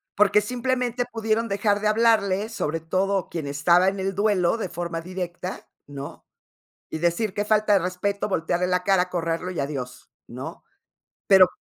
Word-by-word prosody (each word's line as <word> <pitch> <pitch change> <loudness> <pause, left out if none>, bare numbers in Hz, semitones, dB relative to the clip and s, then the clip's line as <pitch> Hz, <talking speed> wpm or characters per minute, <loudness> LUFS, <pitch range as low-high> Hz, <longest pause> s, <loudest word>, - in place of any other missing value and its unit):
Porque 210 +1 +4
simplemente 250 +1 -1
pudieron 225 0 0
dejar 205 0 +1
de 210 - 0
hablarle, 215 -2 +2
sobre 165 -8 -2
todo 190 +3 0
quien 165 -3 -4
estaba 170 +6 +3
en 195 0 0
el 195 0 -2
duelo 200 -2 +2
de 215 - -3
forma 170 -1 -4
directa, 180 +1 -6 0.2
¿no? 140 -1 -9 0.6
Y - - -4
decir: 175 +5 0
"Que 205 +1 -1
falta 215 -1 +3
de 195 - +5
respeto", 185 +3 -2
voltearle 175 -1 0
la 180 0 +1
cara, 185 -2 +2
correrlo 170 0 -2
y 180 - -5
adiós, 130 -3 -5 0.2
¿no? 130 +7 -8 0.7
Pero 190 -2 +8
190 Hz, 160 wpm, -24 LUFS, 170-210 Hz, 0.7 s, Pero